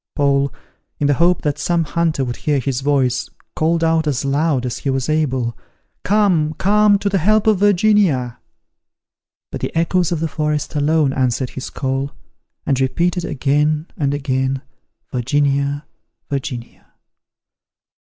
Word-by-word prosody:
Paul, 140 -1 +2 0.5
in 145 - -1
the 145 - +4
hope 170 +4 +2
that 145 -2 -1
some 170 -1 +1
hunter 160 -3 0
would 120 -1 -4
hear 150 -2 0
his 135 0 -2
voice, 130 -4 +1 0.3
called 165 +1 +1
out 160 -1 +2
as 140 -2 -1
loud 140 -1 +1
as 125 - -3
he 140 - -3
was 135 -1 -1
able, 130 -7 0 0.5
"Come, 180 -7 +2
come 210 +1 +4
to 200 - -3
the 195 -1 +1
help 215 +5 +3
of 215 -4 +3
Virginia." 190 - +2 1.1
But - - -6
the - - -2
echoes 170 +1 +1
of 170 - 0
the 165 - -1
forest 150 -1 -2
alone 150 -1 +2
answered 130 -1 0
his 130 - -6
call, 135 +1 -3 0.5
and 135 -1 +1
repeated 170 +6 0
again 150 +2 0
and 140 -4 0
again, 135 -1 -1 0.5
"Virginia 140 +2 0 0.5
Virginia." 125 -3 -6
145 Hz, 140 wpm, -19 LUFS, 135-165 Hz, 1.1 s, the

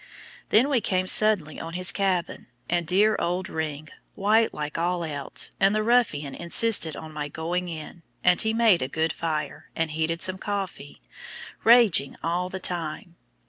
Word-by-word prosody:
Then 230 +6 +4
we 270 -5 +1
came 185 -2 0
suddenly 185 -6 +3
on 165 0 -7
his 180 0 +4
cabin, 190 -3 -2 0.2
and 170 -1 -1
dear 210 +5 +3
old 180 +2 -2
"Ring," 155 -1 -5 0.3
white 220 +3 +2
like 150 0 -6
all 175 +1 -1
else; 145 -4 -2
and 195 +2 +3
the 215 - 0
"ruffian" 215 - +1
insisted 170 -2 +3
on 155 +1 -9
my 150 -1 -4
going 175 +4 -4
in, 160 +1 -9 0.2
and 180 -1 +4
he 220 - 0
made 225 -5 +3
a 130 - -1
good 160 +3 -1
fire, 155 -3 -4
and 165 -1 -2
heated 160 +2 -1
some 185 0 0
coffee, 190 - -6 0.6
raging 225 - +4
all 175 +2 -1
the 190 - -6
time. 175 +1 -4
175 Hz, 165 wpm, -25 LUFS, 160-200 Hz, 0.6 s, Then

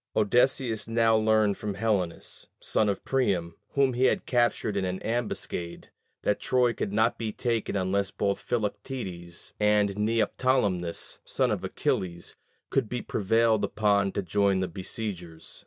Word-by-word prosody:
Odysseus 115 +1 +2
now 115 0 +3
learned 110 -2 +3
from 105 -2 -3
Helenus, 100 -5 -2
son 105 - +1
of 100 - -3
Priam, 95 -11 0 0.2
whom 135 -2 +3
he 125 +2 +2
had - - +2
captured 120 -4 +1
in 100 - 0
an 95 0 -2
ambuscade, 110 -7 -3 0.3
that 105 - +1
Troy 125 -2 +2
could 100 - -3
not 110 +3 +2
be 110 -2 -2
taken 115 -2 -1
unless 100 0 0
both 100 0 -1
Philoctetes 100 -6 -4
and 105 -1 +3
Neoptolemus, 105 -4 0
son - - 0
of - - -2
Achilles, 85 -2 -2 0.4
could 110 - +1
be 125 -1 -3
prevailed 110 +1 +2
upon 100 -1 +2
to 100 - -1
join 100 +1 +2
the 95 - 0
besiegers. 90 -2 -6
105 Hz, 140 wpm, -27 LUFS, 95-115 Hz, 0.4 s, now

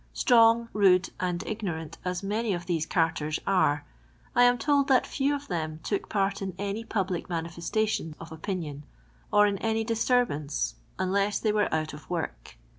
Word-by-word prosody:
Strong, 230 -1 +5
rude, 190 -2 +4
and 180 -1 -2
ignorant 165 -7 -4
as 180 +1 -3
many 210 +2 0
of 175 0 -6
these 165 -3 -1
carters 155 -2 0
are, 145 -7 +2 0.5
I 245 +1 +7
am 245 0 +4
told 285 +1 +2
that 260 -3 +4
few 285 +1 0
of 285 0 -7
them 155 -3 -3
took 200 - -2
part 200 0 0
in 190 -2 -4
any 205 +3 -3
public 190 -6 -2
manifestation 170 +1 -2
of 165 0 -10
opinion, 160 -3 -4 0.5
or 210 0 +6
in 200 -2 0
any 225 0 0
disturbance, 225 - 0 0.2
unless 200 +2 +1
they 215 - +1
were 210 0 +1
out 155 -1 -1
of 150 - -11
work. 160 - -4
195 Hz, 165 wpm, -28 LUFS, 165-220 Hz, 0.5 s, I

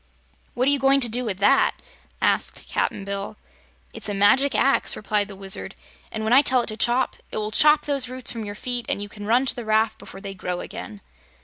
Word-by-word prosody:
"What 255 +2 +1
are - - +6
you 285 - +3
going 270 +1 +4
to 240 - +2
do 240 +3 -2
with 205 -6 -2
that?" 200 +1 +3 0.5
asked - - 0
Cap'n 195 - -2
Bill. 200 +1 -4 0.6
"It's - - -5
a 205 - -2
magic 260 +8 +4
axe," 275 - +2
replied 210 -1 0
the 200 - -9
Wizard, 195 0 -4 0.4
"and 220 - -4
when 220 +2 +1
I 265 - +8
tell 260 -3 +3
it - - -8
to 215 - -4
chop, 240 +3 +1
it - - -6
will 215 0 -2
chop 300 +6 +5
those 275 -4 0
roots 255 -1 -1
from 230 -2 -5
your 205 -1 -6
feet 245 +2 -3
and - - 0
you - - -6
can 205 0 -9
run 245 +4 +3
to - - +1
the 240 - -6
raft 220 0 +1
before 195 - -11
they 195 -1 -6
grow 180 -1 -4
again." 215 -1 -8
220 Hz, 230 wpm, -23 LUFS, 205-255 Hz, 0.6 s, I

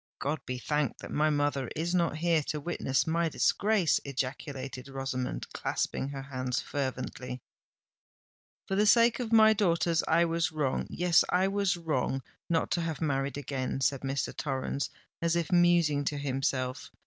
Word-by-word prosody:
"God 145 +2 -2
be 125 0 -3
thanked 150 0 -1
that - - -8
my 155 +1 +2
mother 145 -3 0
is 170 +3 -1
not 170 -4 +1
here 165 -1 +2
to 150 - -2
witness 140 -4 0
my 165 +1 +1
disgrace!" 200 -1 +2
ejaculated 135 -1 -4
Rosamond, 135 -2 -3
clasping 135 - -2
her 135 -1 -6
hands 130 -2 -2
fervently. 130 -2 -4 1.3
"For - - -3
the 210 +2 +3
sake 235 +2 +5
of 235 -3 -3
my 220 -1 +7
daughters 170 -5 +2
I 170 +1 +4
was 165 0 0
wrong—yes, 160 +4 +2
I 185 +1 +3
was 195 -3 +1
wrong 135 -5 -1 0.3
not 165 -1 +1
to 175 - +1
have 160 -3 -3
married 140 -3 -1
again," 135 -2 -3
said 135 0 +1
Mr. 135 0 -2
Torrens, 135 -1 -2 0.3
as 170 0 +1
if 170 -3 -1
musing 175 -5 +4
to 145 - -1
himself. 135 -2 -2
150 Hz, 155 wpm, -30 LUFS, 135-170 Hz, 1.3 s, my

